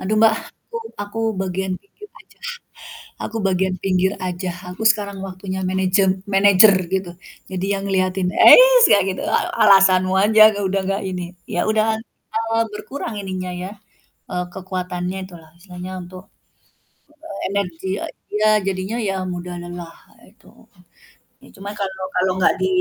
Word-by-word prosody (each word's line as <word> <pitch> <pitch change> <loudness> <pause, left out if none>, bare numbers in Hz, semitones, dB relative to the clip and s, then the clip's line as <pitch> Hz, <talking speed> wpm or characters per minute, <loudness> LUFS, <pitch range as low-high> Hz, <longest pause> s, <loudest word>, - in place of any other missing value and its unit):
"Aduh, 205 +3 -1
Mbak 220 -1 +6 0.4
aku 465 - -5 0.3
aku 205 +2 -6 0.2
bagian 190 0 -2
pinggir 420 +1 -15
aja - - -22 0.9
aku 225 - -5
bagian 190 0 0
pinggir 190 0 +1
aja, 180 +1 -3 0.2
aku 185 - -8
sekarang 200 -3 -2
waktunya 190 0 -6
managem 190 +1 +2 0.3
manager 200 +1 +7 0.2
gitu, 190 -2 -2 0.4
jadi 185 0 -2
yang - - -6
ngeliatin." 185 -1 0
Eits - - +8
kayak 200 -2 +5
gitu, - - -5
"A - - +3 0.2
alasanmu 190 -2 +5
aja 215 0 +6 0.3
udah 195 +1 0
nggak 195 +1 -1
ini," 180 -1 -4 0.3
ya 175 - +1
udah 215 0 +2
lah - - -7 0.3
kalau 225 0 -1 0.2
berkurang 230 +2 -6
ininya 185 -2 -5
ya, 190 - -6 0.6
e 180 - -5 0.2
kekuatannya 185 -1 -4
itu 185 - -14
lah, 160 - -19
istilahnya 180 0 -9
untuk, 185 +1 -12 1.0
eee, 260 -12 -8
energi 190 -3 -3 0.4
dia 215 +1 +3 0.2
jadinya 190 +3 -2
ya 195 - -1 0.2
mudah 175 0 -6
lelah 175 -1 -8 0.4
itu. - - -23 1.0
Ya - - -16
cuma 195 +1 -8
kalau 190 -1 -4
kalau 185 +1 +2
gak - - +4
di 185 - +2
190 Hz, 145 wpm, -20 LUFS, 185-200 Hz, 1.0 s, Eits